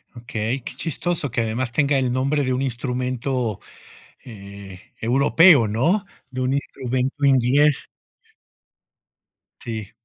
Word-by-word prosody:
Okey, 120 +2 -3
qué - - -7
chistoso 165 -2 -2
que 120 - 0
además 115 +2 -2
tenga 140 0 +2
el 130 -2 0
nombre 140 +3 0
de 130 0 0
un 130 - -1
instrumento, 125 -2 -2 0.6
eh, 100 -4 -11 0.2
europeo, 140 - +5
¿no?, 165 - +1 0.2
de 130 0 -5
un 130 +1 0
instrumento 135 +1 -2
inglés. 135 +2 +3 1.8
Sí. 110 -3 -6
130 Hz, 115 wpm, -22 LUFS, 115-140 Hz, 1.8 s, europeo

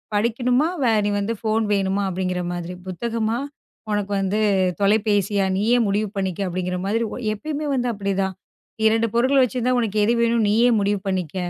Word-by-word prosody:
படிக்கனுமா 245 +6 +1 0.2
வே 235 - +3
நீ - - +1
வந்து 215 +3 -1
ஃபோன் 220 0 +1
வேணுமா 195 0 0
அப்படிங்கிற 180 0 -2
மாதிரி. 175 +1 -5
புத்தகமா 225 +4 -2 0.5
உனக்கு 205 -1 -1
வந்து 195 +2 0 0.4
தொலைபேசியா 205 -1 +2
நீயே 225 +5 +2
முடிவு 205 +2 0
பண்ணிக்க, 190 -2 -2
அப்படிங்கற 180 0 -2
மாதிரி. 225 +3 0 0.3
எப்பவுமே 300 +6 -4
வந்து 245 -2 0
அப்படி 200 -1 -3
தான். 190 0 -1 0.4
இந்த 220 - -4
2 225 +1 +2
பொருட்கள 260 +4 +3
வெச்சிருந்தா, 250 0 0
உனக்கு 215 -2 -1
எது 230 +3 +3
வேணும், 230 -1 +2
நீயே 235 +4 +4
முடிவு 200 0 0
பண்ணிக்க. 185 -3 -2
210 Hz, 160 wpm, -22 LUFS, 195-235 Hz, 0.5 s, நீயே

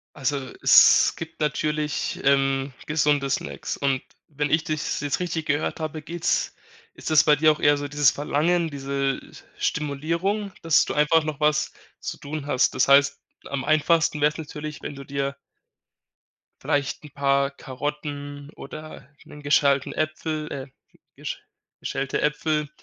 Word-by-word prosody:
Also, 140 0 -1 0.3
es - - +7
gibt 160 0 -8
natürlich, 150 0 -1
ähm, 135 0 +2
gesunde 145 -2 +2
Snacks - - -3
und 135 -2 0 0.3
wenn 145 0 -2
ich 160 +2 +2
dich's 155 -1 -2
jetzt 145 -1 -1
richtig 170 -3 -2
gehört 145 +2 -1
habe, 155 0 -4
geht's 170 +2 -1 0.4
ist - - -5
das 155 - +7
bei 150 - +5
dir 155 +1 +5
auch 150 - -3
eher 145 0 +5
so 145 0 -4
dieses 145 -2 +4
Verlangen, 160 +4 +1
diese, 140 -1 -2
s - - -14
äh, - - -26
Stimulierung, 170 +8 -1
dass 165 -1 +5
du - - -3
einfach 150 +2 +4
noch 150 -2 -4
was 150 0 +2 0.3
zu - - -5
tun 145 0 -6
hast. 130 - +2
Das - - +3
heißt, 140 0 +5 0.3
am 140 -1 -3
einfachsten 155 0 +2
wäre 150 +1 +4
es - - -11
natürlich, 155 -1 -7
wenn 145 - -6
du 140 0 -9
dir 140 0 -2 1.3
vielleicht 145 +1 -1
'n - - -10
paar 140 0 +1
Karotten 145 +1 -6
oder 155 -4 -9 0.2
'nen 150 - -12
geschälten 140 -1 +2
Äpfel 155 0 -3
äh, 135 - -4 0.3
hm, - - -27 0.2
gesch - - -6 0.4
geschälte 135 -1 -2
Äpfel 150 0 0
150 Hz, 160 wpm, -24 LUFS, 140-155 Hz, 1.3 s, es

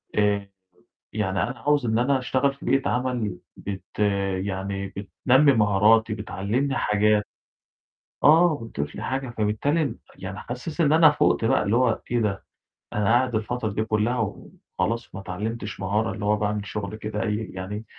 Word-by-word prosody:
آآ، 100 -1 +1 0.6
يعني 95 -3 -1
أنا 125 - -3
عاوز 145 -4 +2
إن 110 0 +1
أنا 130 +3 +2
اشتغل 130 +3 +1
في 140 - -14
بيئة 135 0 +2
عمل 120 -6 -1 0.2
بت 100 -1 -8 0.5
يعني 95 0 -3
بتنمّي 125 +8 +2
مهاراتي، 110 +1 +4
بتعلّمني 110 +6 -2
حاجات، 105 -1 +3 1.0
آه، 160 +1 +6
بتضيف 75 -9 -5
لي - - -6
حاجة. 130 -1 -2
فبالتالي 140 +9 +1 0.2
يعني - - -7
حاسس 125 +8 -6
إن 150 -2 +4
أنا 160 -1 +7
فُوقت 145 - +2
بقى، 115 - +3
اللي 105 +3 +1
هو 125 -2 +2
إيه 120 0 +1
ده، 100 -3 -1 0.5
أنا 105 - 0
قاعد 120 +2 +3
الفترة 110 +1 -1
دي 110 +2 -1
كُلّها 110 +1 0 0.4
وخلاص 115 -3 -1
ما 95 - -5
اتعلّمتش 105 +2 -5
مهارة، 105 +4 0
اللي 105 -1 -6
هو 105 +1 +3
باعمل 105 0 -2
شغل 105 +1 -5
كده 105 0 -4
أي 105 -2 0 0.2
يعني 100 +4 -5
110 Hz, 155 wpm, -25 LUFS, 105-125 Hz, 1.0 s, أنا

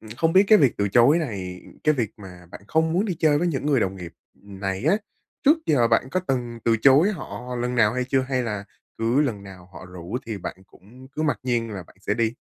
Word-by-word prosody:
ừm, 110 -1 -13
không 165 +3 +1
biết 190 +2 +6
cái 215 - +7
việc 135 -6 +4
từ 100 0 +1
chối 120 - +5
này 95 - -5 0.2
cái 155 - +4
việc 115 -6 -1
mà 90 -4 -12
bạn - - -10
không 160 0 +1
muốn 190 +5 +1
đi 185 -5 -2
chơi 150 -2 +3
với 175 - 0
những 145 -4 -2
người 140 -4 +2
đồng 95 -1 -1
nghiệp 85 -2 -8 0.2
này 95 +2 -6
á, 170 +7 +4 0.5
trước 300 +4 +5
giờ 120 -6 +3
bạn 115 +3 +2
có 185 - 0
từng 125 -7 -3
từ 115 -1 +3
chối 140 - +5
họ 125 -7 -7
lần 125 +1 -2
nào 110 -2 +3
hay 125 0 -1
chưa 130 +1 +1
hay 130 -1 -1
là 105 -4 -4 0.3
cứ 115 +5 +2
lần 115 -9 -1
nào 95 -2 -13
họ 95 - -11
rủ 90 +4 -7
thì 110 -3 -4
bạn 90 - -6
cũng 125 +9 -17
cứ 145 +3 -5
mặc 145 -9 0
nhiên 120 -3 -1
là 95 -3 -6
bạn - - -21
sẽ 105 - -1
đi? 115 0 0
120 Hz, 250 wpm, -24 LUFS, 100-145 Hz, 0.5 s, cái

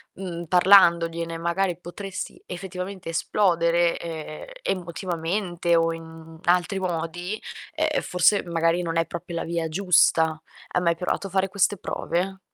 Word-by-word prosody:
mhmm, 175 -3 -5
parlandogliene 170 -2 +4
magari 170 +1 0
potresti 185 +2 -7
effettivamente 185 0 -6
esplodere, 170 -1 +2
ehm, 160 -2 -7 0.2
emotivamente 175 - -1
o 165 0 +2
in, 165 0 -8
mhmm, 160 0 -13
altri 180 +2 +2
modi, 175 +3 -3 0.4
uhm, 310 -1 +1
forse 180 +3 +3
magari 165 +1 +1
non 165 -1 -2
è 165 - +2
proprio 170 +1 -7
la - - -2
via 165 -1 -2
giusta. 160 -3 +3 0.3
Hai 180 - -1
mai 170 -1 +2
provato 185 +2 -2
a - - -10
fare 190 +1 +1
queste 200 +1 +2
prove? 190 +2 -2
175 Hz, 140 wpm, -25 LUFS, 165-185 Hz, 0.4 s, parlandogliene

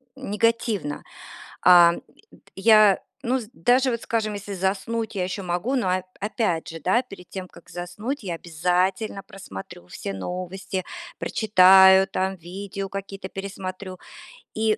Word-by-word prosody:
негативно. 225 - -1 0.6
Ам, 175 -1 +7
д - - -28 0.4
я, 215 -1 +6 0.2
ну, 255 +1 0
с 215 - -11
даже 250 +5 +2
вот, 235 -1 -3
скажем, 220 -2 -1
если 200 0 -6
заснуть, 205 +4 -2
я 185 - 0
ещё 185 +2 -5
могу, 180 +9 -1
но 190 -8 +1
оп 185 - -8 0.2
опять 205 -6 -1
же, 165 - -7
да, 185 +10 +2
перед 195 -8 -13
тем 190 -1 -6
как - - -17
заснуть, 210 +10 -5
я 175 -4 -3
обязательно 180 +5 -1
просмотрю 95 - -10
все 100 - -6
новости, 185 - -5 0.3
прочитаю, 190 -2 +6
там 190 0 -2
видео 195 +3 -6
какие-то 195 0 -6
пересмотрю. 190 -1 -7 0.5
И 220 0 +1
195 Hz, 140 wpm, -24 LUFS, 180-215 Hz, 0.6 s, Ам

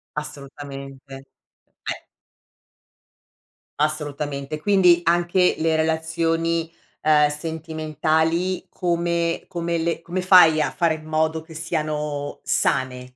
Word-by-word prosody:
Assolutamente. 140 -2 -7
Eh 135 0 -13 2.3
Assolutamente. 150 -1 -2
Quindi 180 -2 +4
anche 175 +2 +2
le 160 0 +1
relazioni, 165 +1 0 0.3
ehm, 150 -1 +4
sentimentali 160 +2 -1
come 170 -1 -1
come 170 -2 -2
le 165 0 -1
come 180 +2 -3
fai 175 -4 +7
a 150 - +1
fare 165 -2 +1
in 155 0 -12
modo 155 0 0
che 160 0 -14
siano 150 -2 -3
sane? 125 -1 -1
160 Hz, 95 wpm, -22 LUFS, 150-170 Hz, 2.3 s, fai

